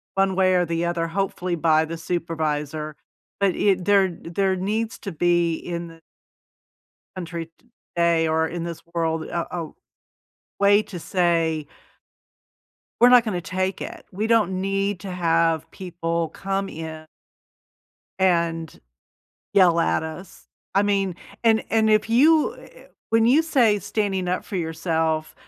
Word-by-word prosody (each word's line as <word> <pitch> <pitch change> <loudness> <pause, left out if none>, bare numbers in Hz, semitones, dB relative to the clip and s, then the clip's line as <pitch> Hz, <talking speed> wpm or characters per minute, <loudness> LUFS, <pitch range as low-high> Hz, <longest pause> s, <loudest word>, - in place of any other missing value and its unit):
one 195 -1 +2
way 185 0 +3
or 180 - +3
the 165 +1 -1
other, 170 -1 -1
hopefully 180 0 -2
by 160 -1 +3
the 165 +1 -6
supervisor. 155 -3 -3 0.4
But 200 -2 +2
i 200 -2 +3
there 195 0 +3
there 190 +3 0
needs 215 +4 -2
to 195 - -6
be 175 0 +2
in 170 0 -5
the 165 0 -14 1.1
country 170 -2 -6 0.4
today 170 -1 +3
or 160 0 +1
in 170 +1 -5
this 170 -1 -6
world 165 -1 0
a 170 +1 -4
a 165 -3 -4 0.9
way 205 +1 +5
to 185 -4 -8
say 165 -4 0 1.4
""e're 245 - +8
not 250 -2 +7
gonna 185 -6 -2
take 185 +2 -2
it. - - -7
We 210 +4 -2
don't 200 -5 +2
need 195 -1 -1
to 195 -2 -6
have 165 -2 +1
people 170 -3 -3
come 195 +2 -3
in" 160 0 -7 1.1
"and 170 -3 0 0.8
yell 175 -4 +5
at - - +1
us." 160 +4 -9 0.3
I 200 - +4
mean 195 -3 0 0.3
and 225 -1 +3
and 220 -1 +3
if 215 +1 +2
you 305 +6 +4
eh - - -14
eh - - -16 0.2
when 225 0 +4
you 260 +7 +5
say 245 -10 +3
standing 195 -2 -2
up 180 - -1
for 200 - -5
yourself, 160 -1 -1
175 Hz, 145 wpm, -23 LUFS, 165-195 Hz, 1.4 s, e're